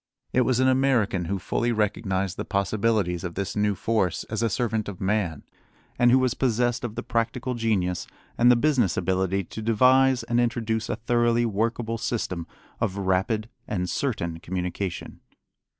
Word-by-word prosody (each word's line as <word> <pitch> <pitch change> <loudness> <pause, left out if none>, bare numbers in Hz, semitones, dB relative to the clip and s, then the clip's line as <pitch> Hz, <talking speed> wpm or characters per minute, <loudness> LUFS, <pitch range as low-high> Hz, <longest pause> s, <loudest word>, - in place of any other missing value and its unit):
It 130 - +4
was 125 0 +2
an 130 - +4
American 130 -9 +2
who 100 +4 -1
fully 120 +5 -1
recognized 95 -3 -1
the - - -4
possibilities 100 -2 0
of 90 -2 -5
this 100 0 -3
new 105 -1 +1
force 100 -3 0
as 110 0 -1
a 115 - +2
servant 110 -2 -1
of 95 - -8
man, 95 -6 -1 0.6
and 120 - +5
who 125 - +6
was 130 -2 +2
possessed 120 -1 0
of 115 -3 -4
the - - -4
practical 120 +2 -1
genius 105 -7 -1 0.3
and 120 +1 +5
the 125 - +7
business 120 - +2
ability 95 +1 0
to 110 - -8
devise 125 +3 +4
and 120 +1 0
introduce 115 -2 -1
a 120 - 0
thoroughly 120 +1 +2
workable 115 +1 -1
system 95 -8 -3 0.3
of 100 -3 -1
rapid 100 +3 0 0.2
and 90 -3 -2
certain 85 -11 -2
communication. 90 +1 -4
110 Hz, 165 wpm, -25 LUFS, 95-120 Hz, 0.6 s, the